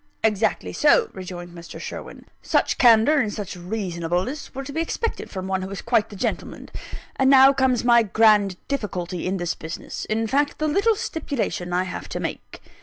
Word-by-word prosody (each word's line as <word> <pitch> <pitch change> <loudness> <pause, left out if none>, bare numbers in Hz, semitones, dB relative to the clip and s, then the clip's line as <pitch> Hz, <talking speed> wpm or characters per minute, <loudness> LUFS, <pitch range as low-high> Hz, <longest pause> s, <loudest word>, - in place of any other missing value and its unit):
"Exactly 215 -3 0
so," 460 -3 +3
rejoined 175 -2 -8
Mr. 170 -1 -10
Sherwin; - - -8 0.2
"such - - +1
candour 240 +5 +6
and 215 -5 0
such 205 -3 -6
reasonableness 180 - -3
were 270 - -4
to 280 - -8
be 320 - 0
expected 455 +7 -3
from 190 -2 -5
one 190 0 -1
who 190 - -5
is 195 - -6
quite 235 -3 +2
the 205 - -10
gentleman. 190 - -4 0.5
And 265 0 +3
now 270 0 +8
comes 260 -3 +1
my 235 -1 +6
grand 210 -3 +3
difficulty 180 - -3
in 190 +1 -1
this 175 -2 -2
business 160 +2 -7
in 220 +1 -1
fact, 285 +5 0
the 310 - 0
little 400 +8 +2
stipulation 275 - -3
I 180 +1 +1
have 185 - -6
to - - -4
make." - - -6
215 Hz, 180 wpm, -23 LUFS, 185-270 Hz, 0.5 s, now